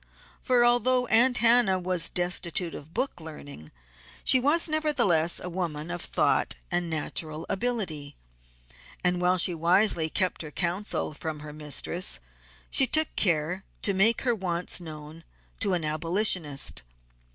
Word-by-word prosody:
For 245 -1 +3
although 250 +1 +3
Aunt 245 +2 +4
Hannah 230 -4 +4
was 180 -2 +1
destitute 175 -1 -2
of 150 +3 -10
book 250 -2 -3
learning 145 - -11 0.5
she 260 - +5
was 295 +7 +2
nevertheless 250 - +1
a - - -7
woman 170 -3 -4
of 175 -1 -5
thought - - 0 0.2
and 175 -1 -1
natural 155 0 -3
ability, 190 -10 -3 0.9
and 180 0 0
while 180 +1 +2
she 180 0 +4
wisely 170 0 +2
kept 185 +2 -2
her 155 - -7
counsel 175 +2 -3
from 155 0 -6
her 150 0 -9
mistress 145 - 0 0.5
she 265 - +3
took 315 +4 +1
care 175 +1 0 0.2
to 200 - +3
make 205 +5 +2
her 245 -2 +1
wants 180 -5 0
known 155 0 -10 0.4
to 200 -4 +1
an 170 -3 -1
abolitionist. 155 - +2
180 Hz, 140 wpm, -26 LUFS, 160-220 Hz, 0.9 s, she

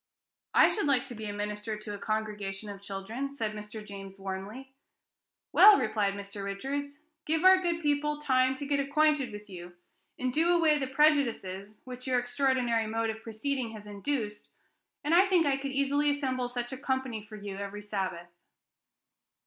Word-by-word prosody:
"I - - +7
should 415 - -1
like 270 -3 +3
to 245 - -7
be 215 -2 -5
minister 210 +1 -3
to 215 -1 -7
a 205 - -6
congregation 210 -2 -3
of 200 -1 -10
children," 205 +8 -5
said 220 -5 -2
Mr. 210 0 -8
James 195 -1 -9
warmly. 195 +8 -6 0.8
"Well," 420 -1 +9
replied 210 -2 0
Mr. 200 0 -7
Richards, 275 +9 -4 0.3
"give 320 +2 +1
our 375 0 +7
good 340 -2 -1
people 295 0 0
time 260 -2 +2
to 285 - -6
get 285 0 +1
acquainted 285 -2 +2
with 210 0 -9
you, 175 -2 -9 0.4
and 255 -1 -1
do 330 +4 +3
away 310 -3 +4
the 265 - -1
prejudices 235 -9 +1
which 255 0 -8
your 255 -1 +2
extraordinary 245 -3 +1
mode 225 +1 0
of 220 0 -9
proceeding 230 +2 -3
has 210 -1 -10
induced, 210 +1 -4 0.5
and 300 +3 +1
I 370 +3 +6
think 360 -4 +4
I 280 -1 +3
could 275 0 -4
easily 280 +2 +2
assemble 260 -4 -1
such 245 0 -4
a - - -5
company 260 -4 -2
for 215 +1 -11
you 200 -2 -7
every 200 +1 -6
Sabbath." 185 -4 -4
240 Hz, 175 wpm, -30 LUFS, 210-280 Hz, 0.8 s, Well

